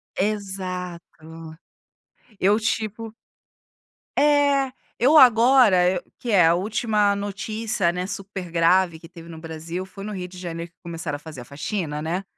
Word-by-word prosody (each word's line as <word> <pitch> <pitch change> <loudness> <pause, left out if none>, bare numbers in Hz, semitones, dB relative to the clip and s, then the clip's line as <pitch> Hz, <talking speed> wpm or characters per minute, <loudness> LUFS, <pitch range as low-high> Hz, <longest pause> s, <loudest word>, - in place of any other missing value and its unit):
Exato. 180 -5 -5 0.8
Eu 205 +4 +3
tipo 220 0 -3 1.0
É, 285 -2 +3 0.3
eu 275 +7 +4
agora, 230 -8 +6
que 240 - -4
é 180 -5 +6
a 165 - +4
última 210 +1 +1
notícia, 205 -1 -2
né, 180 +1 -4
super 195 -2 -6
grave 170 0 +2
que 165 - -13
teve 170 -1 -13
no 165 - -9
Brasil, 165 +3 -6
foi 195 +1 -11
no 215 - -5
Rio 185 -3 -5
de 180 0 -12
Janeiro 170 -1 -6
que - - -51
começaram 165 -4 -5
a - - -17
fazer 150 -4 -10
a 120 - -11
faxina, 150 0 -4
né, 175 +5 -2
185 Hz, 145 wpm, -23 LUFS, 170-215 Hz, 1.0 s, agora